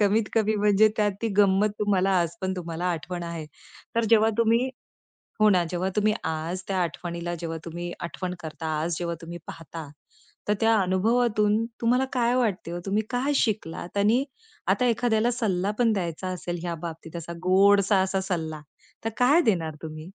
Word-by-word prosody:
कमीत 210 +1 +3
कमी 220 -1 +2
म्हणजे 210 +1 +5
त्यात 205 -2 +2
ती 230 - +1
गंमत 200 +1 +4
तुम्हाला 195 -2 +2
आज 170 0 -2
पण 190 0 -1
तुम्हाला 170 0 -4
आठवण 175 +1 -4
आहे. 170 -2 -5 0.5
तर 230 0 +2
जेव्हा 220 -1 +6
तुम्ही 230 +2 +3 0.7
हो 215 - +6
ना. 180 -3 +4
जेव्हा 180 +2 -1
तुम्ही 215 0 +3
आज 160 +3 -3
त्या 195 - -1
आठवणीला 175 +1 -3
जेव्हा 165 -1 -4
तुम्ही 175 +1 -5
आठवण 180 +1 -4
करता, 160 0 -6
आज 165 0 -1
जेव्हा 170 -1 -2
तुम्ही 170 +1 -7
पाहता, 165 -1 -8 0.6
तर 210 - +3
त्या 225 0 +4
अनुभवातून 215 +3 +2 0.2
तुम्हाला 250 +3 +3
काय 245 -1 +2
वाटते 215 -9 0
हो? 175 - -4
तुम्ही 205 +2 +1
काय 260 +4 0
शिकलात? 205 -7 -1
आणि 220 +6 +3 0.4
आता 250 - +2
एखाद्याला 235 -1 +2
सल्ला 200 -5 0
पण 230 -2 +4
द्यायचा 180 -2 -3
असेल 175 -1 -4
ह्या 170 -1 -3
बाबतीत 165 0 -8
असा, 170 0 -5
गोडसा 200 +2 +5
असा 190 0 0
सल्ला, 160 -5 -3 0.4
तर 225 - 0
काय 280 +7 +5
देणार 165 -6 -1
तुम्ही? 155 -1 -7
190 Hz, 170 wpm, -26 LUFS, 170-220 Hz, 0.7 s, जेव्हा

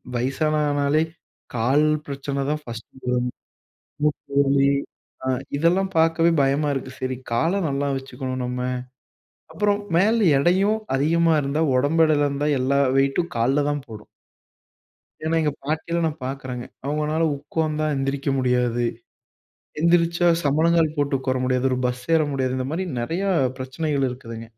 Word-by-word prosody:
வயசானானாலே 145 +3 +1 0.5
கால் 130 +6 +3 0.2
பிரச்சனை 140 0 -4
தான் 150 0 -1
ஃபர்ஸ்ட் 115 -3 -8 0.2
வரும். 125 0 0 0.7
மூட்டு 150 -2 -1
வலி 140 0 +3 0.5
அ - - -5 0.3
இதெல்லாம் 180 +5 +2
பார்க்கவே 165 +1 +4
பயமா 140 +2 +1
இருக்கு. 130 -1 -4
சரி, 130 0 -2 0.2
கால 160 +9 +2 0.2
நல்லா 140 0 -1
வச்சுக்கணும், 130 -1 -5
நம்ம. 125 0 -3 0.9
அப்பறம் 205 +4 +1
மேல 215 +6 +4 0.2
எடையும் 190 +8 +3 0.2
அதிகமா 165 +3 +3
இருந்தா, 145 +4 0
உடம்பு 145 +5 +3
எடையில 145 -2 +2
இருந்தா 145 +1 -1
எல்லா 135 +2 +2 0.2
வெயிட்டும் 140 +6 +1
கால்ல 135 +5 +2
தான் 145 -2 -3
போடும். 110 -2 -10 1.2
ஏன்னா, 160 +1 0
எங்க 150 -2 +1
பாட்டிலாம் 165 +2 -1
நான் 155 -2 -6
பார்க்குறேங்க. 130 -2 -5 0.2
அவங்கனால 150 +3 0
உட்கார்ந்தா 155 +1 -2
எந்திரிக்க 135 +1 -1
முடியாது. 125 -1 +1 1.0
எந்திரிச்சா, 170 +1 +3 0.2
சம்பனங்கால் 160 +2 +3
போட்டு 145 -1 +1
உட்கார 130 -1 -1
முடியாது. 130 0 +1
ஒரு 130 - 0
பஸ் 125 0 -4
ஏற 160 - +3
முடியாது. 130 -1 -1
இந்த 130 - -2
மாரி 185 +3 -2
நிறையா 175 +11 -1 0.3
பிரச்சனைகள் 135 +1 -1
இருக்குதுங்க. 115 -2 -8
145 Hz, 130 wpm, -23 LUFS, 130-160 Hz, 1.2 s, பார்க்கவே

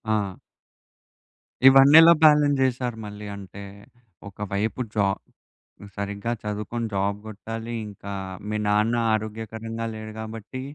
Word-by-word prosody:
ఆ! 100 -3 -3 1.3
ఇవన్నీ 135 +3 +8
ఎలా 165 +1 +8
బాలన్స్ 150 -2 +5
చేసారు? 125 -2 -1
మళ్ళీ 105 0 -8
అంటే 100 0 -10 0.7
ఒక 100 - -13 0.2
వైపు 105 +5 -1
జాబ్ 100 -2 +1 0.8
సరిగ్గా 100 +3 -3
చదువుకొని 105 +2 -3
జాబ్ 100 +1 0
గొట్టాలి. 115 +2 -7
ఇంకా 100 0 -8 0.4
మీ 105 - -2
నాన్న 105 +3 +2 0.2
ఆరోగ్యకరంగా 110 +1 -4
లేరు 110 0 -8
గాబట్టి 110 +3 -7
110 Hz, 110 wpm, -24 LUFS, 105-120 Hz, 1.3 s, ఇవన్నీ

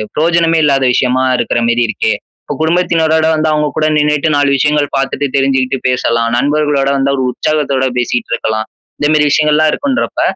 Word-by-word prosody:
பிரயோஜனமே 165 0 +2
இல்லாத 140 -2 +2
விஷயமா 130 +1 +1
இருக்கிற 120 - -1
மேரி 120 0 +1
இருக்கே, 110 0 -1 0.3
இப்போ 145 - -5
குடும்பத்தினரோடு 160 -1 +1
வந்து, 155 0 0
அவங்க 150 -1 0
கூட 155 0 +1
நின்னுட்டு, 150 +1 +1
நாலு 145 -1 +2
விஷயங்கள் 145 +1 +1
பார்த்துட்டு, 135 +1 -2
தெரிஞ்சுகிட்டு 135 -1 0
பேசலாம். 115 -2 0
நண்பர்களோட 145 0 0
வந்தா, 140 +1 0
ஒரு 130 - 0
உற்சாகத்தோட 140 -2 -1
பேசிட்டு 120 -1 -2
இருக்கலாம். 110 0 -2 0.3
இந்த 145 - +1
மாரி 150 -1 +3
விஷயங்கள்லாம் 155 0 +2
இருக்குன்றப்ப, 280 -1 -2
145 Hz, 155 wpm, -13 LUFS, 130-155 Hz, 0.3 s, மாரி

